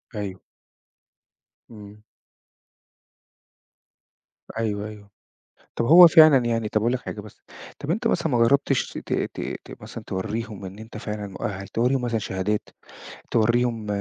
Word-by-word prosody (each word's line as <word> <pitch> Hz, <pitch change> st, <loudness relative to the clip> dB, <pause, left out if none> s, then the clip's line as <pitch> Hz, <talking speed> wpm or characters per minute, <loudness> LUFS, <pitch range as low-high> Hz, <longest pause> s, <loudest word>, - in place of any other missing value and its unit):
أيوه. 100 Hz, -3 st, -5 dB, 1.3 s
إمم. 105 Hz, -1 st, -13 dB, 2.6 s
أيوه، 105 Hz, -2 st, -2 dB
أيوه، 105 Hz, -1 st, -12 dB, 0.7 s
طَب 115 Hz, -, -1 dB
هو 175 Hz, +6 st, +10 dB
فعلًا 155 Hz, -3 st, +7 dB
يعني 115 Hz, -2 st, -1 dB
طَب 105 Hz, -, 0 dB
أقول 120 Hz, +3 st, +1 dB
لك 130 Hz, -, -1 dB
حاجة 105 Hz, -, -7 dB
بس، 105 Hz, 0 st, -15 dB, 0.4 s
طَب 145 Hz, -, -3 dB
أنت 225 Hz, +6 st, 0 dB
مثلًا 170 Hz, -6 st, 0 dB
ما 130 Hz, -6 st, +1 dB
جربتش 135 Hz, +1 st, +1 dB
ت -, -, -5 dB
ت -, -, -3 dB, 0.3 s
ت -, -, -12 dB
مثلًا -, -, -9 dB
توريهم 105 Hz, +1 st, -4 dB
إن 95 Hz, +2 st, -9 dB
أنت 110 Hz, 0 st, -10 dB
فعلًا 105 Hz, -2 st, -5 dB
مؤهل؟ 100 Hz, 0 st, -5 dB
توريهم 125 Hz, +3 st, 0 dB
مثلًا 120 Hz, -2 st, -1 dB
شهادات، 100 Hz, +1 st, -2 dB, 0.6 s
توريهم 115 Hz, 0 st, +1 dB
110 Hz, 135 wpm, -24 LUFS, 105-125 Hz, 2.6 s, هو